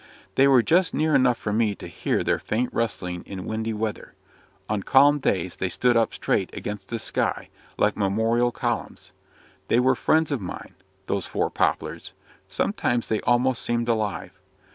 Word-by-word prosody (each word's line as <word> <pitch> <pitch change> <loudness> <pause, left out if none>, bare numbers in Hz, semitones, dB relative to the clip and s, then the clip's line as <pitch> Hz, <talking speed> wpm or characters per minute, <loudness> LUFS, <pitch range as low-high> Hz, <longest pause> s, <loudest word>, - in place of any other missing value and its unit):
They 135 - +5
were 130 -4 +5
just 175 +5 +2
near 155 0 +1
enough 130 -3 +4
for 105 - -3
me 110 -2 +1
to - - -10
hear - - -2
their - - +1
faint 120 +4 -2
rustling 90 -6 -2
in 95 -2 -6
windy 110 +1 -2
weather; 110 0 -4 0.5
on 105 -1 -1
calm 145 +7 +5
days 90 -8 -1
they 95 - -1
stood 120 +7 +2
up 115 -1 +3
straight - - -1
against 105 -2 -6
the 115 - -2
sky, 110 - -2 0.3
like - - +2
memorial 110 +4 +1
columns. - - -4 0.6
They 115 - +3
were 130 +1 +4
friends 155 +4 +2
of 135 -6 -1
mine 90 - -7 0.3
those - - -2
four - - -1
poplars; - - -1 0.4
sometimes 120 -1 -1
they 110 - 0
almost 125 0 +2
seemed 120 0 -1
alive. 110 -3 -1
115 Hz, 165 wpm, -24 LUFS, 105-125 Hz, 0.6 s, They